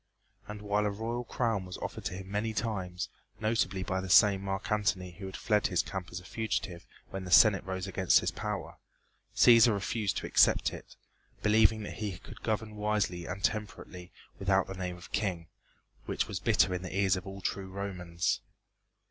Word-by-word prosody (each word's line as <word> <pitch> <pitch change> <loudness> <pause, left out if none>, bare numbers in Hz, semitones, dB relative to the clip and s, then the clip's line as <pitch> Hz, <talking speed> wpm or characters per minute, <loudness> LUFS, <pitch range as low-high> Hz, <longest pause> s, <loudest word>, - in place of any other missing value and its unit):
And 105 0 -7
while 105 0 +1
a - - +1
royal 115 +4 -3
crown 115 -5 -1
was 90 - -7
offered - - -6
to - - -2
him 95 +1 -8
many 110 +2 -1
times, 95 -4 -2 0.3
notably 110 -3 0
by 95 0 -2
the 95 - -6
same 100 +1 +6
Marc 95 +1 -4
Antony 100 -4 0
who 95 +3 -8
had 95 - -7
fled 105 -3 +1
to - - +2
his 90 +1 +1
camp 95 -4 -5
as 90 - -5
a 90 - -16
fugitive 105 -4 -3 0.2
when 95 0 -5
the 90 - -7
Senate 100 +2 +6
rose 95 -1 -3
against 95 -1 +3
his - - -1
power - - -5 0.6
Cæsar 115 -1 +7
refused 100 -1 -1
to - - -3
accept - - +4
it, - - -11 0.5
believing 110 0 +4
that - - -7
he 105 -4 -3
could - - -13
govern 110 -1 -2
wisely 105 -5 -1
and 95 +2 -6
temperately 90 -4 -3 0.3
without 95 0 +2
the 95 - -7
name 90 -1 -4
of 90 - -13
King, 90 -6 -2 0.6
which - - -1
was - - -4
bitter 95 - +3
in 90 - -2
the 95 +1 -5
ears 95 -2 +3
of 95 +1 -6
all 95 0 -7
true 95 0 -3
Romans. 90 -3 -2
95 Hz, 190 wpm, -30 LUFS, 95-105 Hz, 0.6 s, Cæsar